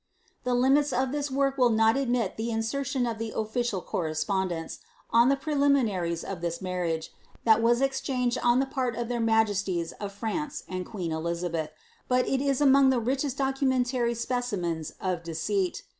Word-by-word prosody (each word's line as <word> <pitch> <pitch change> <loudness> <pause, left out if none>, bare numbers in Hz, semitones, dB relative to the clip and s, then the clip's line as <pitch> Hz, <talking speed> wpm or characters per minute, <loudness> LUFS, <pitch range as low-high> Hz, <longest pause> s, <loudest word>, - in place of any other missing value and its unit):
The 250 -1 +1
limits 270 +4 +3
of 260 0 +1
this 290 0 -2
work 275 0 0
will 250 -1 +5
not 225 0 +4
admit 245 -6 0
of - - -25
the 225 +2 -2
insertion 245 +3 -1
of 230 -2 -3
the 225 -1 -3
official 220 -2 -1
correspondence, 170 +1 -2 0.3
on 235 +2 +5
the 275 - +4
preliminaries 270 - +1
of 190 -4 -6
this 170 -1 -2
marriage^ 175 -4 -2 0.3
that 220 -1 +5
was 240 +3 +3
ex 270 -1 0
changed 250 -2 0
on 240 +1 +4
the 270 - +2
part 255 -3 -2
of 240 0 -3
their 240 -1 -1
majesties 205 -6 +1
of 205 -1 -4
France 230 +9 -4
and 185 -1 -4
queen 180 -6 -4
Elizabeth, 165 0 -2 0.4
but 250 0 +2
it 270 -1 +1
is 275 -1 +1
among 275 -1 +6
the 260 -2 +2
richest 265 +3 -1
documentary 260 -3 +1
specimens 205 -10 -2
of 180 -3 -2
deceit. 175 +3 -2
235 Hz, 175 wpm, -27 LUFS, 185-265 Hz, 0.4 s, among